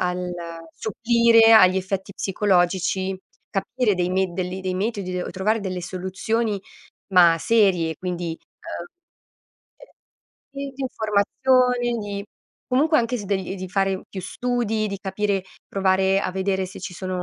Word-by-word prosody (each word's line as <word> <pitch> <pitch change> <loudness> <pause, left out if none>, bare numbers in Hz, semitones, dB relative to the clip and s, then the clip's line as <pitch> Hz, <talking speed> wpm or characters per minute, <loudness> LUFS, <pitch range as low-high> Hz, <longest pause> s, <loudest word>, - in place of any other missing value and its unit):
al 180 0 -1 0.4
supplire 230 0 +4
agli 185 -4 +7
effetti 190 +1 -3
psicologici, 190 -1 +1 0.3
capire 220 +2 0
dei 180 0 0
med 185 -1 0
de 185 - -1
li 185 +1 -5
dei 185 -1 -2
metodi, 190 -3 -2
o - - -4
trovare 210 +4 0
delle 185 -3 -4
soluzioni, 195 +4 -2 0.5
ma 175 -2 +7
serie; 185 -8 +2
quindi, 175 -2 -4
uhm 335 - -11 1.5
uhm, - - -2
sì, - - -19
di 275 - -11
informazioni, 245 +2 +1
di 200 -1 -5 0.4
comunque 300 +5 +3
anche 240 -1 +1
s 205 - -6
degl 190 -1 -2
di 185 -1 -6
fare 195 0 0
più 190 - -7
studi, 225 +1 -1
di 200 -1 -4
capire, 200 0 -1 0.3
provare 190 0 +2
a 185 - -2
vedere 190 0 0
se 185 - -9
ci 180 - -6
sono 185 0 -4
195 Hz, 145 wpm, -23 LUFS, 185-225 Hz, 1.5 s, agli